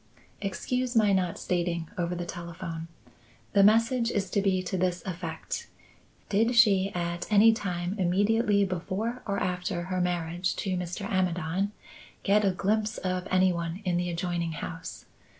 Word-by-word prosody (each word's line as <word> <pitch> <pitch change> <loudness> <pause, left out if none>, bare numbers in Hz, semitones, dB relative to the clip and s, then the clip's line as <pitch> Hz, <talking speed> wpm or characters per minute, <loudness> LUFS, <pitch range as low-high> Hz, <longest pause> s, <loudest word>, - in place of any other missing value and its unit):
"Excuse 245 +5 -2
my 210 -3 +5
not 185 -3 +1
stating 170 -2 -1
over 175 0 -1
the 175 0 -4
telephone. 170 -1 -6 0.7
The 200 - +6
message 230 +3 +4
is 195 -5 -1
to 200 - +2
be 190 -2 +1
to 185 - -3
this 180 -2 0
effect. 170 -3 -5 0.6
Did 225 +4 +2
she 200 -5 +5
at 175 +2 -3
any 215 +2 +7
time 180 -3 -3
immediately 200 +3 +3
before 190 +7 -3
or 200 -1 0
after 180 -1 -2
her 185 +1 -2
marriage 175 0 -1
to 190 -2 -2
Mr. 180 +3 -4
Amidon 185 0 0 0.5
get 210 +2 +4
a 200 - +4
glimpse 210 +3 0
of 185 0 -2
any 185 0 +4
one 170 +1 -3
in 175 -1 +1
the 175 0 -1
adjoining 170 -1 -2
house? 165 +2 -7
185 Hz, 150 wpm, -28 LUFS, 175-205 Hz, 0.7 s, any